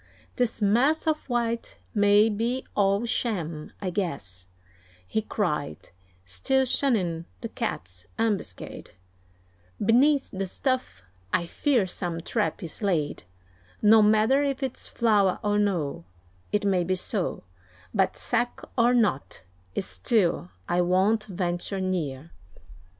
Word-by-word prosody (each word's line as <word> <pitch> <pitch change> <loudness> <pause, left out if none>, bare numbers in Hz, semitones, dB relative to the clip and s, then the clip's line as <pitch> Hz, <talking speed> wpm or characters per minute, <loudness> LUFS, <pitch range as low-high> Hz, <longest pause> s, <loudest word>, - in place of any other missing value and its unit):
"This 235 -3 0
mass 250 +10 +3
of 310 -3 -1
white 235 -1 -1 0.2
may 205 0 +5
be 230 +4 -1
all 200 +2 +2
sham, 170 -10 -2
I 185 -2 -3
guess," 140 - -4 0.6
He 220 - -1
cried, 150 - -2 0.4
still 260 - +1
shunning 190 -12 +1 0.2
the - - -4
Cat's 90 +1 -5
ambuscade: 205 - -3 0.8
"Beneath 270 +6 +3
the 195 0 -3
stuff 250 - -2 0.3
I 170 - +1
fear 245 - +1
some 175 -2 -4
trap 210 +3 -1
is 165 - -6
laid; 170 -8 0 0.6
No 220 +1 +7
matter 215 +6 +4
if 275 -1 -1
it's 260 -2 -3
flour 210 -5 +2
or 205 0 +2
no, 170 - -1 0.5
It 205 0 +1
may 190 -3 +2
be 185 +2 0
so; 185 0 -1 0.5
But 190 -2 +1
sack 240 0 -1 0.2
or 240 0 +4
not, 135 - 0 0.3
still 100 - +1 0.2
I 175 +1 +2
won't 190 +5 +2
venture 180 0 -2
near." 165 -6 -3
205 Hz, 120 wpm, -26 LUFS, 175-230 Hz, 0.8 s, No